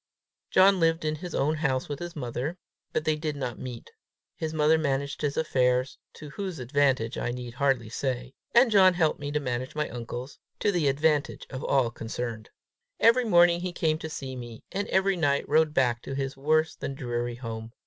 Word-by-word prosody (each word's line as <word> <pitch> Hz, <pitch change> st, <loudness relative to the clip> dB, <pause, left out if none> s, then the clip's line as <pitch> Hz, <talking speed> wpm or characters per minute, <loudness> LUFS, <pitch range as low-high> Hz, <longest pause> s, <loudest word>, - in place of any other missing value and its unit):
John 190 Hz, 0 st, +5 dB
lived 165 Hz, -1 st, +2 dB
in 155 Hz, 0 st, -1 dB
his 175 Hz, +1 st, -6 dB
own 155 Hz, +3 st, +1 dB
house 135 Hz, -4 st, 0 dB
with 145 Hz, -1 st, -5 dB
his 175 Hz, 0 st, -6 dB
mother, 130 Hz, +4 st, -3 dB, 0.3 s
but 155 Hz, -, -1 dB
they 155 Hz, -, +2 dB
did 150 Hz, -1 st, -3 dB
not 130 Hz, -4 st, -4 dB
meet. 125 Hz, -2 st, -8 dB, 0.4 s
His 160 Hz, -1 st, -3 dB
mother 155 Hz, 0 st, +3 dB
managed 140 Hz, -2 st, -1 dB
his 145 Hz, -1 st, -1 dB
affairs, 130 Hz, -4 st, +1 dB
to 150 Hz, -1 st, -10 dB
whose 190 Hz, -1 st, -5 dB
advantage 130 Hz, -2 st, +1 dB
I -, -, -1 dB
need 120 Hz, -1 st, -5 dB
hardly 135 Hz, -3 st, +1 dB
say; 125 Hz, +2 st, -3 dB, 0.2 s
and 240 Hz, 0 st, +6 dB
John 190 Hz, -3 st, +6 dB
helped 160 Hz, -3 st, +1 dB
me 145 Hz, 0 st, -4 dB
to 150 Hz, -, 0 dB
manage 130 Hz, -1 st, -3 dB
my 150 Hz, 0 st, 0 dB
uncle's, 120 Hz, +3 st, -7 dB, 0.2 s
to 205 Hz, -, +2 dB
the 170 Hz, -6 st, +1 dB
advantage 150 Hz, +1 st, +1 dB
of 130 Hz, 0 st, -5 dB
all 130 Hz, -4 st, +2 dB
concerned. 115 Hz, -1 st, -5 dB, 0.5 s
Every 235 Hz, +2 st, +5 dB
morning 175 Hz, -4 st, +5 dB
he 180 Hz, 0 st, -3 dB
came 155 Hz, -2 st, 0 dB
to 160 Hz, -, -5 dB
see 135 Hz, -4 st, -6 dB
me, 120 Hz, -2 st, -9 dB
and 200 Hz, +1 st, -2 dB
every 190 Hz, 0 st, +2 dB
night 140 Hz, -4 st, +1 dB
rode 155 Hz, +1 st, +3 dB
back 125 Hz, -4 st, +1 dB
to 135 Hz, -, -6 dB
his 135 Hz, 0 st, -3 dB
worse 155 Hz, +3 st, +1 dB
than 135 Hz, -, -5 dB
dreary 120 Hz, -2 st, -3 dB
home. 115 Hz, -2 st, -6 dB
145 Hz, 195 wpm, -27 LUFS, 125-160 Hz, 0.5 s, and